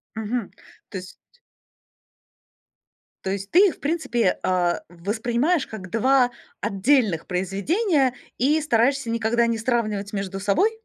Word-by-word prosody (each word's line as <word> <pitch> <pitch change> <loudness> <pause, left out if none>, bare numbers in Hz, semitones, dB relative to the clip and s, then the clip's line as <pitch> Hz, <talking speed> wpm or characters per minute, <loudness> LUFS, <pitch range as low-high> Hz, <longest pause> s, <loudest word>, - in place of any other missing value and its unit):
Мгм. 220 0 -3 0.4
То 195 - -5
есть 185 0 -11 2.1
То 190 - -1
есть 195 0 -4
ты 385 +4 +6
их, - - -4
в - - -30
принципе, 280 - 0
а, 180 -2 +1
воспринимаешь 235 - 0
как 185 -5 -9
2 250 +3 +3 0.3
отдельных 200 - +1
произведения 255 - +1 0.2
и 295 +5 +3
стараешься 270 -2 +1
никогда 230 +1 +1
не 230 -1 0
сравнивать 215 -3 -1
между 195 -1 -4
собой? 205 - +2
230 Hz, 120 wpm, -23 LUFS, 195-270 Hz, 2.1 s, ты